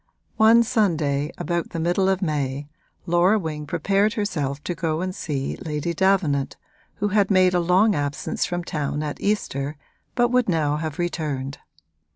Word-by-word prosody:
One 225 +2 +6
Sunday, 160 - +1
about 170 +1 -2
the 165 - -5
middle 175 +3 +2
of 190 0 0
May, 145 -3 -2 0.4
Laura 175 +4 +3
Wing 155 -5 -4
prepared 200 +7 +1
herself 150 -11 -2
to 175 - -2
go 160 -1 -2
and 185 0 -2
see 140 -6 -3
Lady 155 +1 -3
Davenant, 170 -7 +1 0.4
who 205 0 -1
had 205 -1 +2
made 185 -2 +4
a 180 - +3
long 185 +5 +4
absence 145 -3 -2
from 175 0 -2
town 150 -2 -2
at 150 -1 -5
Easter 150 -8 -1 0.4
but 240 -1 +3
would 250 -3 +2
now 150 -4 +1
have 155 0 -4
returned. 150 -6 -3
170 Hz, 160 wpm, -23 LUFS, 150-195 Hz, 0.4 s, One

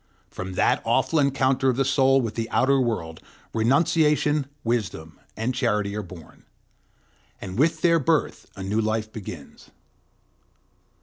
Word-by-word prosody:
From 95 0 -6
that - - +2
awful 160 - +1
encounter 135 -1 +2
of 125 - 0
the 135 - +2
soul 135 0 +3
with 115 -3 -3
the 115 +1 -4
outer 135 +1 +2
world, 85 -10 -3 0.3
renunciation, 150 +4 +2 0.2
wisdom, 105 -9 -3 0.2
and 115 +4 -1
charity 105 -3 -1
are 105 - -2
born; 90 -4 -13 1.0
and 95 +3 -6
with 160 +2 +2
their 170 -1 +4
birth 160 +2 0
a 95 - -7
new 105 +3 0
life 110 0 -2
begins. 90 - -10
120 Hz, 135 wpm, -24 LUFS, 105-140 Hz, 1.0 s, their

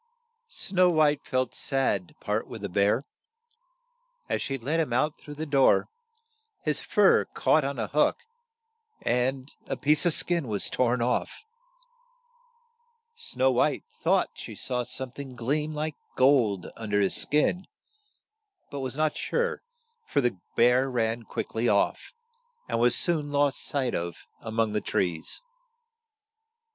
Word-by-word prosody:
" 470 - -52
Snow 185 - +2
White 150 -3 +3
felt 130 -2 -1
sad 130 -9 0
to - - -21
part - - -2
with - - -9
the - - -3
bear. 100 +8 +2 1.2
As - - -1
she 135 - -2
let 145 +7 -1
him 155 -6 0
out 150 +6 0
through 145 - -10
the 155 +2 -4
door, 140 -3 +3 0.7
his 150 -1 0
fur 205 -2 +4
caught 155 - +3
on 140 0 -3
a 110 - -1
hook, 150 +8 +2 0.9
and 130 +2 0 0.2
a - - -3
piece 150 +1 +2
of 170 - +5
skin 170 -4 +1
was 105 -3 0
torn 125 -1 +1
off. 125 - -2 1.7
Snow 460 - 0
White 125 - +1 0.2
thought - - +2
she - - -9
saw 125 -1 -2
some 125 +1 -4
thing 135 -1 -9
gleam 145 +6 -1
like 155 0 -3 0.2
gold 120 -8 +3
un 110 -2 -6
der 105 0 +2
his 100 - +2
skin, 150 +5 +1 1.0
but 140 - -5
was 130 0 -4
not 155 -1 +1
sure, 475 0 -1 0.5
for - - +1
the 120 -8 0 0.2
bear 125 +3 +4
ran 115 -2 -1
quick 115 - -5
ly 115 +2 0
off, - - +1 0.6
and - - -1
was 120 +1 +5
soon 155 -4 +1
lost 145 -1 +2
sight 135 -4 -1
of 85 0 -4
a 110 - -7
mong 110 -1 0
the 105 - 0
trees. 85 - -2
130 Hz, 150 wpm, -27 LUFS, 120-150 Hz, 1.7 s, of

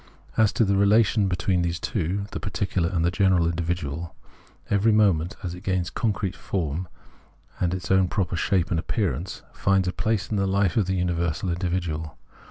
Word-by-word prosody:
As 110 -2 +4
to 115 - +3
the 100 0 +2
relation 105 +1 +4
between 90 0 0
these 85 0 -1
two 100 +2 -2
[the - - -4
particular 95 -3 -1
and 85 -1 0
general 95 -4 +3
individual], 85 -1 -3 0.5
every 100 +3 +3
moment, 100 -4 +3
as 90 -2 -3
it 90 - -9
gains 95 -3 -1
concrete 105 -4 -1
form 85 -1 -3 0.7
and 90 - +1
its 95 +1 -3
own 95 -1 +4
proper 90 -1 -1
shape 90 +2 +1
and 85 - +2
appearance, 90 - -2
finds 95 -1 +2
a 90 - -1
place 110 -2 -1
in 105 - +1
the 95 0 +1
life 95 -2 +1
of 105 -5 +2
the 95 - 0
universal 85 -1 -1
individual. 85 -4 -2
95 Hz, 175 wpm, -25 LUFS, 85-100 Hz, 0.7 s, As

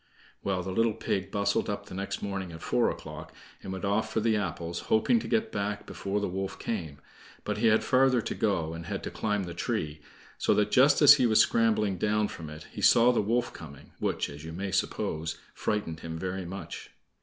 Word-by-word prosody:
Well, 95 -2 -1
the 95 - -4
little 115 +3 +2
pig 95 0 -2
bustled 100 0 0
up - - -3
the - - -11
next 100 +1 -4
morning 95 -3 -3
at 80 -1 -10
four - - +2
o'clock, - - -8 0.3
and - - -6
went 95 +1 -4
off 110 +2 0
for 110 - +1
the 110 0 +2
apples, 85 -4 -3
hoping 230 - +4
to - - -6
get 225 0 0
back 100 0 -3
before 100 +1 -3
the 105 - -1
wolf 95 +1 -4
came; 85 -11 -4 0.5
but - - -2
he 115 - +3
had 110 0 +4
farther 130 -1 +4
to - - -3
go, 85 -7 0
and 85 0 -7
had - - -4
to - - -4
climb 105 -2 -1
the 85 -1 -6
tree, 75 -2 -3 0.4
so - - +3
that 105 0 +2
just 140 +3 +5
as 145 0 +10
he 125 -3 +3
was 110 -1 +4
scrambling 105 -4 +3
down 105 +1 +1
from 80 -2 -8
it, 75 0 -9
he - - -7
saw 120 +1 +6
the 120 - +2
wolf 120 +4 0
coming, 70 -4 -11
which, - - -1
as 70 +1 -10
you 80 - -7
may 95 +3 -4
suppose, 80 -4 -1 0.2
frightened 90 -7 -2
him 80 0 -6
very 95 +1 -4
much. 95 +3 -7
100 Hz, 215 wpm, -29 LUFS, 85-110 Hz, 0.5 s, as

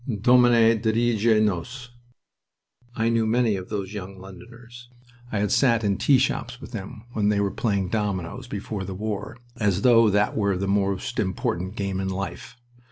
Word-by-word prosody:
"Domine, 120 -1 +5
dirige 115 -1 +2
nos!" 120 +6 -3 1.0
I 115 0 +1
knew 115 -1 +1
many 115 -1 +2
of 95 -1 -7
those 100 -2 -4
young 95 -1 -7
Londoners. 115 +6 -13 0.4
I 110 - -1
had 105 -1 0
sat 115 -4 +3
in 100 -2 +1
tea 140 - +4
shops 125 -1 -2
with 140 - -11
them 110 +1 -8
when 105 -2 +1
they 105 -1 +1
were 100 -1 0
playing 100 -5 -1
dominoes, 105 +2 -3
before 100 -2 -5
the 95 0 -6
war, 105 +2 -5 0.2
as 100 -3 0
though 115 -3 +6
that 105 +1 +1
were 100 -3 +1
the 100 +1 -2
most 100 -1 -1
important 95 -1 -2
game 100 -3 -3
in 95 0 -2
life. 95 +5 -6
105 Hz, 165 wpm, -24 LUFS, 95-115 Hz, 1.0 s, though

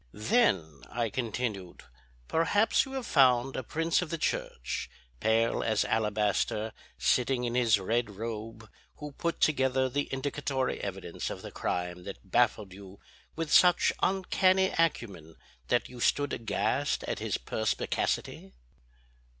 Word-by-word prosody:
"Then," 105 - +1
I 115 -3 -2
continued, 110 -6 -4 0.4
"perhaps 205 +7 +2
you 270 - -9
have 265 -2 -3
found 130 -4 +4
a - - -2
prince 165 +8 0
of 175 - -4
the 165 - -2
church, 60 - -3 0.3
pale 115 - +2
as 110 -2 +1
alabaster, 105 0 0 0.2
sitting 125 0 +1
in 120 -1 -1
his 115 -4 +3
red 115 +4 0
robe, 110 +1 -6 0.3
who 150 0 -8
put 170 +4 -3
together 130 -3 +2
the 145 +3 -2
indicatory 135 -1 -2
evidence 95 -3 -5
of - - -7
the - - -7
crime 90 0 -3
that 100 -1 -10
baffled 110 -5 +2
you 95 0 -12 0.4
with 160 -2 -2
such 180 -1 +5
uncanny 190 0 +2
acumen 100 - -1 0.3
that 120 - +1
you 125 - -11
stood 145 +3 +1
aghast 115 +5 -1
at - - -3
his - - -1
perspicacity?" 65 - -2
120 Hz, 135 wpm, -29 LUFS, 105-145 Hz, 0.4 s, such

